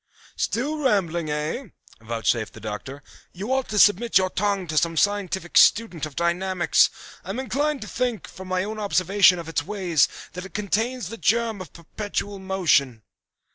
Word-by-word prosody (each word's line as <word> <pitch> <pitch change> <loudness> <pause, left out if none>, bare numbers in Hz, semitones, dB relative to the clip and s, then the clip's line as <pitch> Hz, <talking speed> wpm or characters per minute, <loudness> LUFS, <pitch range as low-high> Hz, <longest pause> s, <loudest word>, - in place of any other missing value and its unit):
"Still 290 +7 -1
rambling, 175 - 0
eh?" 150 - -2 0.4
vouchsafed 115 0 -1
the - - -11
Doctor. 110 +7 -7 0.3
"You 205 +8 -3
ought 265 -1 -1
to 210 - -2
submit 210 +2 +5
your 185 -1 +1
tongue 200 -1 0
to 155 -2 -5
some 165 +2 -1
scientific 190 -3 0
student 180 -9 +3
of 145 - -14
dynamics. 175 0 +2 0.3
I 180 - -11
am 205 +6 -3
inclined 280 +3 -1
to 215 - -6
think, 245 -5 -2
from 190 0 -11
my 185 0 0
own 215 +2 -5
observation 195 -2 +4
of 170 -2 -7
its 165 -2 -1
ways, 175 -4 +1 0.3
that 180 0 -6
it 195 - -12
contains 215 +2 -1
the 230 - -7
germ 225 -2 +1
of 185 - -9
perpetual 200 +3 -5
motion." 160 - +1
190 Hz, 170 wpm, -24 LUFS, 165-215 Hz, 0.4 s, submit